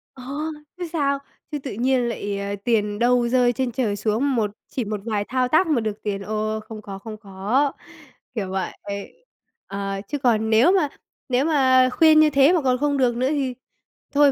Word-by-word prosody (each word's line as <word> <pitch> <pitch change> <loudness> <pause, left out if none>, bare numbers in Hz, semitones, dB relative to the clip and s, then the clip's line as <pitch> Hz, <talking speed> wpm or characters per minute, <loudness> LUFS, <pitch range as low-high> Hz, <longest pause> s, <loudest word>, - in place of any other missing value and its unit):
Ờ, 255 - -11 0.5
chứ 360 - -5
sao. 280 -3 +1 0.3
Chứ 295 - -2
tự 270 -1 -6
nhiên 250 +2 +1
lại, 205 -3 -3
ờ, 200 0 -3
tiền 210 -3 +1
đâu 245 0 +3
rơi 245 -1 +3
trên 250 +1 -1
trời 225 -4 -1
xuống 225 +7 0
một 215 -3 0 0.2
chỉ 250 - -3
một 210 0 -3
vài 210 -3 -1
thao 255 +2 0
tác 315 +7 +3
mà 295 -7 +2
được 215 -1 -4
tiền, 200 -2 -2
ô, 215 +2 -2
không 215 0 -9
có, 195 -2 -8
không 215 +1 -8
có, 210 +8 0 0.6
kiểu 195 -5 -2
vậy. 190 0 -2 1.0
Ờ, 195 0 -4
chứ 290 - -2
còn 220 -4 +2
nếu 230 +10 +5
mà 365 -7 +2 0.4
nếu 255 +2 +2
mà 260 -4 +4
khuyên 310 +3 +5
như 310 0 +6
thế 280 +3 +5
mà 340 - +2
còn 255 -2 +2
không 285 +1 0
được 250 -3 +2
nữa 255 +2 +1
thì 275 -4 -1 0.6
thôi 285 -1 +5
245 Hz, 195 wpm, -23 LUFS, 215-275 Hz, 1.0 s, như